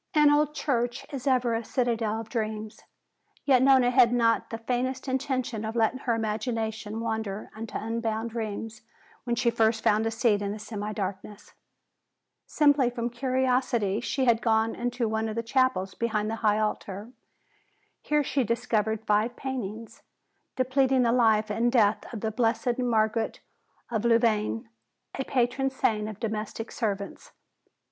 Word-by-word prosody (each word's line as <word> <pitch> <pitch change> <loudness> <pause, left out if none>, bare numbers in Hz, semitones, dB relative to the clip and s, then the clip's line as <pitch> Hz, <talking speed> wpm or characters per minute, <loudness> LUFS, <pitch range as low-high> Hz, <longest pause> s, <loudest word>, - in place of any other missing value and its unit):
An 300 -1 +6
old 300 0 +2
church 245 -3 -1
is 275 0 -5
ever 250 -3 +2
a 225 +1 -1
citadel 225 -3 -1
of 225 - -10
dreams. 220 -2 -4 0.6
Yet 260 -3 +5
Nona 260 -2 +5
had 250 -2 +5
not 230 -2 +2
the 225 - -4
faintest 255 +3 -2
intention 260 -4 -2
of 220 +1 -4
letting 230 +2 +1
her 240 -3 0
imagination 220 0 -3
wander 220 -3 -3
into 225 +1 -5
unbounded 225 0 -3
realms 220 0 -4 0.4
when 240 -1 0
she 235 0 +2
first 225 -1 +1
found 215 +2 +3
a - - +1
seat 225 -2 +1
in 200 0 -2
the - - -6
semi 210 -1 -5
darkness. 200 0 -6 0.9
Simply 285 -4 +3
from 240 -1 -3
curiosity 250 -4 0
she 265 +2 -1
had 235 -2 +3
gone 225 -1 +2
into 245 -1 -2
one 220 0 -1
of 215 - -5
the 230 - -2
chapels 230 -6 +1
behind 220 -2 -1
the 225 - -3
high 210 -1 +3
altar. 210 0 -3 0.9
Here 300 0 +1
she 275 -1 0
discovered 220 -2 -1
five 215 +3 +1
paintings, 230 -4 -6 0.5
depicting 260 0 +2
the 235 - +3
life 220 -3 +3
and 230 +3 +1
death 215 -4 +2
of 225 -4 -6
the 220 - -1
blessed 235 +2 0
Margaret 225 -2 0 0.5
of 220 -2 -1
Louvain, 220 - +2 0.5
the 270 - -3
patron 255 +1 +1
saint 215 -5 0
of 215 -2 -9
domestic 220 0 -4
servants. 200 -4 -4
230 Hz, 155 wpm, -27 LUFS, 215-250 Hz, 0.9 s, An